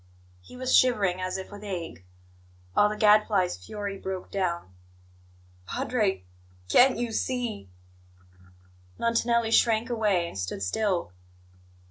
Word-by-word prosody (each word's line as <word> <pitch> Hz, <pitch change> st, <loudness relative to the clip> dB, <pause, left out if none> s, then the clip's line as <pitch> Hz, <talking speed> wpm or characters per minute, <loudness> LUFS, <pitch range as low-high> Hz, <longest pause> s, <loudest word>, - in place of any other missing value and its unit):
He 250 Hz, -, -14 dB
was 255 Hz, 0 st, +1 dB
shivering 200 Hz, -8 st, +3 dB
as 185 Hz, +1 st, -2 dB
if 190 Hz, -, -8 dB
with 205 Hz, 0 st, -10 dB
ague. 175 Hz, -, -6 dB, 0.7 s
All 205 Hz, -, +5 dB
the 210 Hz, -, -4 dB
Gadfly's 210 Hz, -, +3 dB
fury 200 Hz, -, -5 dB
broke 190 Hz, -1 st, -6 dB
down. 170 Hz, -, -2 dB, 0.9 s
"Padre, 210 Hz, -, -1 dB, 0.5 s
can't 255 Hz, -, +5 dB
you 240 Hz, -1 st, -2 dB
see 235 Hz, -, -3 dB, 0.6 s
" 90 Hz, 0 st, -27 dB
Montanelli 230 Hz, 0 st, +1 dB
shrank 230 Hz, +1 st, +3 dB
away, 205 Hz, -7 st, +1 dB
and 95 Hz, -, -7 dB
stood 90 Hz, +1 st, -4 dB
still. 175 Hz, -, -1 dB
200 Hz, 120 wpm, -27 LUFS, 170-225 Hz, 0.9 s, All